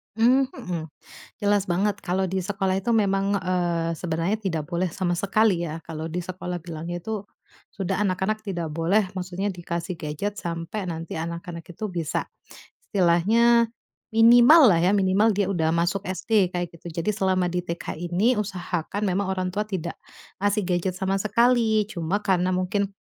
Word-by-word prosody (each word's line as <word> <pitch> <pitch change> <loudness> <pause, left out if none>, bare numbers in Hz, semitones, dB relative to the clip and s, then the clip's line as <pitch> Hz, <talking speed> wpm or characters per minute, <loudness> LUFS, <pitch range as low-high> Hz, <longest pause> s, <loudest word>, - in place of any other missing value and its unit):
Mmm, 250 +4 +4
mhm. 180 -10 -5 0.6
Jelas 205 -1 +2
banget 200 +3 0
kalau 190 +1 0
di 190 - -2
sekolah 190 0 -1
itu 215 +5 0
memang, 195 -2 +2
eee, 175 -3 0
sebenarnya 170 +5 -1
tidak 165 -7 -3
boleh 175 +1 0
sama 175 -2 -1
sekali 200 -2 +2
ya, 160 0 -6
kalau 160 -1 -6
di 165 +2 -3
sekolah 180 0 -5
bilangnya 170 +1 -6
itu, 210 +1 -4 0.5
sudah 195 -3 -2
anak-anak 210 +2 -1
tidak 175 -5 -3
boleh 175 +6 +1
maksudnya 185 +2 -3
dikasih 175 -1 -4
gadget 165 +7 -4
sampai 170 +4 -4
nanti 165 0 -5
anak-anak 170 +1 -5
itu 175 +5 -5
bisa 170 -4 -3 0.6
istilahnya 220 +6 +4 0.4
minimal 240 +7 +7
lah 165 - +2
ya, 190 +4 +3
minimal 195 +3 +3
dia 205 -1 +1
udah 175 -5 0
masuk 170 +3 +1
SD, 190 +1 +1
kayak 175 -1 -4
gitu. 170 +1 -10
Jadi 210 +6 0
selama 190 -2 +1
di 180 0 -1
TK 170 -1 -5
ini 175 +8 +1
usahakan 195 -2 -3
memang 190 0 0
orang 185 -1 -1
tua 205 - 0
tidak 185 -5 -3 0.5
ngasih 205 +1 +2
gadget 180 +1 0
sama 190 +1 0
sekali. 225 0 +3
Cuma 185 -2 -2
karena 185 -2 +1
mungkin 185 +2 0
185 Hz, 160 wpm, -25 LUFS, 170-205 Hz, 0.6 s, minimal